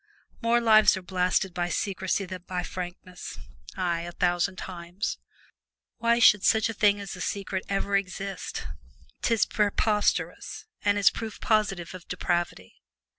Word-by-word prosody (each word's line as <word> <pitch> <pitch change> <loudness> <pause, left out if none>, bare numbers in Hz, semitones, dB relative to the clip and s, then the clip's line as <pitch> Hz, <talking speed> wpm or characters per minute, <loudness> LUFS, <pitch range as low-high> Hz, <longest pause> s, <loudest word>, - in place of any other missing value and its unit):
More 235 0 +3
lives 215 -3 +6
are 190 - -7
blasted 180 0 0
by 175 -1 -1
secrecy 190 +2 -1
than 185 -1 -7
by 180 -1 -2
frankness 180 0 -7 0.4
ay! 175 -3 0
a 175 +1 -6
thousand 175 +2 +1
times. 180 +2 -5 0.8
Why 235 0 +3
should 210 -4 +6
such 220 0 +3
a - - -3
thing 205 -1 +3
as 200 -1 -6
a - - -8
secret 195 -1 -2
ever 200 0 0
exist? 195 0 -3 0.6
'Tis 230 -2 +3
preposterous, 210 0 0 0.2
and 205 0 +3
is 200 - +5
proof 225 -2 -6
positive 200 -6 +1
of 185 -1 -10
depravity. 175 - -2
195 Hz, 140 wpm, -27 LUFS, 180-210 Hz, 0.8 s, lives